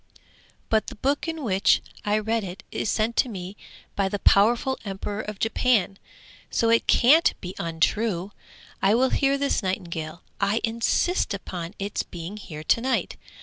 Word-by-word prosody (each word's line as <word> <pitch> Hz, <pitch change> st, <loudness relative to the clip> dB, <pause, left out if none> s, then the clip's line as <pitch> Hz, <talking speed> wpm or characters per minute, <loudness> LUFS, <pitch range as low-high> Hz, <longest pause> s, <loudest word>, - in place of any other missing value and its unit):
'But 220 Hz, -1 st, +2 dB
the -, -, -7 dB
book 280 Hz, +8 st, -1 dB
in 325 Hz, -2 st, -4 dB
which 195 Hz, -4 st, +3 dB, 0.2 s
I 210 Hz, 0 st, +1 dB
read 220 Hz, +1 st, 0 dB
it 185 Hz, 0 st, -7 dB
is -, -, -2 dB
sent 225 Hz, +2 st, 0 dB
to 255 Hz, -, +3 dB
me 190 Hz, -2 st, -7 dB, 0.4 s
by 195 Hz, -1 st, +1 dB
the 205 Hz, -, -2 dB
powerful 230 Hz, +7 st, +3 dB
Emperor 205 Hz, +1 st, -4 dB
of 210 Hz, -2 st, -7 dB
Japan, 220 Hz, -3 st, +1 dB, 0.5 s
so 230 Hz, 0 st, +2 dB
it 230 Hz, -, +3 dB
can't 300 Hz, +7 st, +5 dB
be 180 Hz, 0 st, -6 dB
untrue. 175 Hz, +4 st, 0 dB, 0.5 s
I 200 Hz, +3 st, +4 dB
will 255 Hz, +2 st, +3 dB
hear 275 Hz, 0 st, +2 dB
this 280 Hz, -2 st, 0 dB
nightingale; 175 Hz, -4 st, -4 dB, 0.2 s
I 200 Hz, +2 st, +2 dB
insist 230 Hz, -, +1 dB
upon 180 Hz, -1 st, -6 dB
its 200 Hz, +1 st, -2 dB
being 175 Hz, +4 st, -8 dB
here 155 Hz, -7 st, -8 dB
to 230 Hz, -, +2 dB
night. 260 Hz, +1 st, -1 dB
210 Hz, 160 wpm, -25 LUFS, 190-230 Hz, 0.5 s, can't